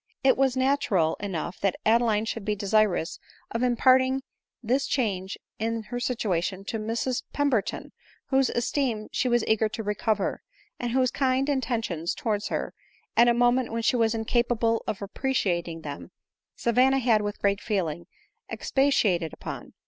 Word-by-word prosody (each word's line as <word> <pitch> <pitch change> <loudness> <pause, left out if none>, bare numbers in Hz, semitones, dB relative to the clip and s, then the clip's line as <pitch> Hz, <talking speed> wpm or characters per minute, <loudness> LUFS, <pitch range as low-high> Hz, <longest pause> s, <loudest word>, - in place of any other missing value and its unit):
It 265 -1 +5
was 265 -1 +1
natural 260 - +2
enough 185 -3 -4
that 195 -2 +1
Adeline 225 -1 +3
should 225 -1 -4
be 210 +1 -1
desirous 205 -4 +1 0.3
of 230 - -2
imparting 260 +2 +3 0.4
this 255 +5 +1
change 195 -7 -1 0.2
in 225 0 -1
her 245 +3 -5
situation 195 -6 -1
to 225 - -2
Mrs 235 +4 -1
Pember 280 -7 +2
ton, - - -7 0.4
whose 265 -1 +3
esteem 240 -3 -1
she 255 - 0
was 240 -1 +2
eager 220 0 +2
to 225 - -5
recover, 210 0 -1 0.4
and 240 -1 -2
whose 255 -1 +2
kind 265 0 +1
intentions 230 - -1
towards 210 -3 -1
her, - - -3 0.4
at 235 - +6
a 240 - +5
moment 245 0 +2
when 230 0 -2
she 250 - +3
was 230 -1 +2
incapable 230 0 +1
of 200 - -3
appreciating 180 -8 -1
them, 140 - -7 0.5
Savanna 255 +3 +3
had, 235 -5 +3
with 205 0 -3
great 200 0 0
feeling, 170 -5 -2 0.4
expatiated 205 - +1
upon. - - -8
225 Hz, 150 wpm, -26 LUFS, 200-255 Hz, 0.5 s, at